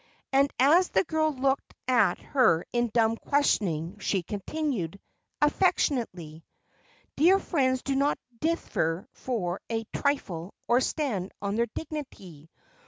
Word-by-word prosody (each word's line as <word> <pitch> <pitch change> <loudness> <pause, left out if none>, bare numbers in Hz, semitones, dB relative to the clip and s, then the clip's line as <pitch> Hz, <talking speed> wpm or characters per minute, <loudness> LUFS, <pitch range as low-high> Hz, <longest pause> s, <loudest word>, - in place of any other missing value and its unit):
And 275 +1 +4
as 325 +8 +5
the 190 - +2
girl 315 +4 +1
looked 270 0 -1
at 255 -2 +3
her 230 - +2
in 240 0 +1
dumb 225 0 +2
questioning 200 - 0
she 190 -2 0
continued, 205 - -3 0.4
affectionately, 235 - 0 0.7
"Dear 355 +6 +5
friends 260 -9 0
do 275 - -1
not 280 +2 +2 0.2
differ 225 - -1
for 195 -8 -3
a 225 -1 -1
trifle, 195 - -2
or 240 +2 +4
stand 235 - -2
on 200 0 -2
their 235 +1 +1
dignity. 195 - -7
240 Hz, 120 wpm, -27 LUFS, 190-285 Hz, 0.7 s, as